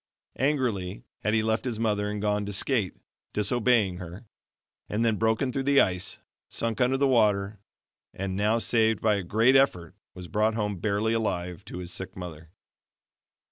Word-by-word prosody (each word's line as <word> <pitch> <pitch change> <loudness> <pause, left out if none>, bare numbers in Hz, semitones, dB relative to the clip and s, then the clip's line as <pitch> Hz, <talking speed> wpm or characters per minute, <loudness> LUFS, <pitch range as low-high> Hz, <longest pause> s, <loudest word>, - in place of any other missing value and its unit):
Angrily 115 - 0 0.2
had 105 +1 0
he 110 - +2
left 110 0 0
his 120 -4 -3
mother 105 -2 0
and 105 0 -3
gone 105 0 0
to 105 - -4
skate 105 -1 0 0.4
disobeying 105 -3 +2
her; 90 +5 -9 0.6
and 110 +3 0
then 110 -2 +2
broken 110 +4 +1
through 135 - -2
the 140 -1 +6
ice, 90 0 +1 0.3
sunk 115 0 -2
under 125 +2 +3
the 140 +1 +3
water, 105 -4 +2 0.5
and 95 0 -4
now 105 +3 +2
saved 110 -2 +2
by 110 -1 +2
a - - -2
great 115 +9 +3
effort, 90 - +2 0.2
was 90 -1 -8
brought 110 +3 +1
home 105 -4 -2
barely 105 +3 0
alive 95 -4 -2
to 95 - -8
his 90 -1 -5
sick 95 0 -5
mother. 85 -3 -8
105 Hz, 170 wpm, -27 LUFS, 95-115 Hz, 0.6 s, the